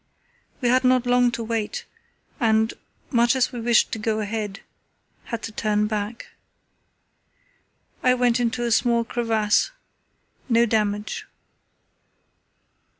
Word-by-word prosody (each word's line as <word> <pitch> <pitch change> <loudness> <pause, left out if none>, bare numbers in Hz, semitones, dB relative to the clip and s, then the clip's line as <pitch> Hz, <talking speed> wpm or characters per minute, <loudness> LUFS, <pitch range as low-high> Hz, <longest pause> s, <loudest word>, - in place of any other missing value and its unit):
"We 245 - +2
had 255 +1 +3
not 255 -1 +3
long 245 0 +4
to 235 - -3
wait, 225 -2 -3 0.5
and, 220 -2 +2 0.4
much 240 -1 +3
as 260 - +1
we 240 - -6
wished 235 0 +3
to 225 - -3
go 215 0 -1
ahead, 210 -1 -4 0.6
had 230 -2 -5
to 225 - -5
turn 210 -1 0
back. 210 +1 -4 1.7
I 250 0 +4
went 245 -1 +2
into 240 0 -1
a 235 - -1
small 235 0 +3
crevasse; 225 -3 +1 0.8
no 235 0 +4
damage. 210 -2 -1
230 Hz, 120 wpm, -23 LUFS, 215-240 Hz, 1.7 s, long